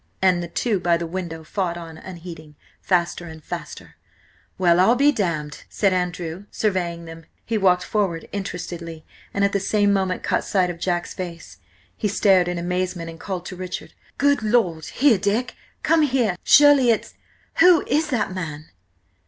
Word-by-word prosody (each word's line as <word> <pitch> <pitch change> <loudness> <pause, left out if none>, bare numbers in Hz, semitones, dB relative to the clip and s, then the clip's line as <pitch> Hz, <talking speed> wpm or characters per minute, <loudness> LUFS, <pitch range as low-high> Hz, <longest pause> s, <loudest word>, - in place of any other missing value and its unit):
And 185 -2 +3
the 170 - -4
two 205 +4 -1
by 175 -1 +2
the 170 - -4
window 165 -2 -5
fought 175 +1 -2
on 165 -2 -9
unheeding, 170 -4 -10 0.3
faster 175 -1 0
and 160 -1 -11
faster. - - -8 0.6
"Well, 175 -2 +4
I'm 250 +9 +4
damned!" 155 - -3
said 200 -3 +1
Andrew, 180 0 -3
surveying 175 -5 -2
them. 165 0 -11 0.2
He 230 - -2
walked 180 -2 +3
forward 190 -6 -1
interestedly, 170 -4 -6 0.3
and 200 0 +1
at 200 - +1
the 200 - +2
same 205 +1 +2
moment 190 -2 -1
caught - - 0
sight 185 -3 +1
of 170 - -10
Jack's 175 -1 -2
face. 170 - -8 0.4
He - - -1
stared 195 -3 +3
in 175 0 -2
amazement, 180 -1 -2
and 165 - -13
called 185 -3 -5
to 185 - -7
Richard. 180 0 -6 0.2
"Good 285 -2 +3
Lord! 210 -8 +1
Here! 255 -7 +3
Dick! 210 +6 0 0.3
Come 330 -1 +4
here! 250 -9 +1
Surely 290 -4 +6
it's–who 330 +8 +2
is 310 +2 +1
that 225 -8 -1
man?" 155 -4 -6
185 Hz, 160 wpm, -22 LUFS, 170-205 Hz, 0.6 s, Surely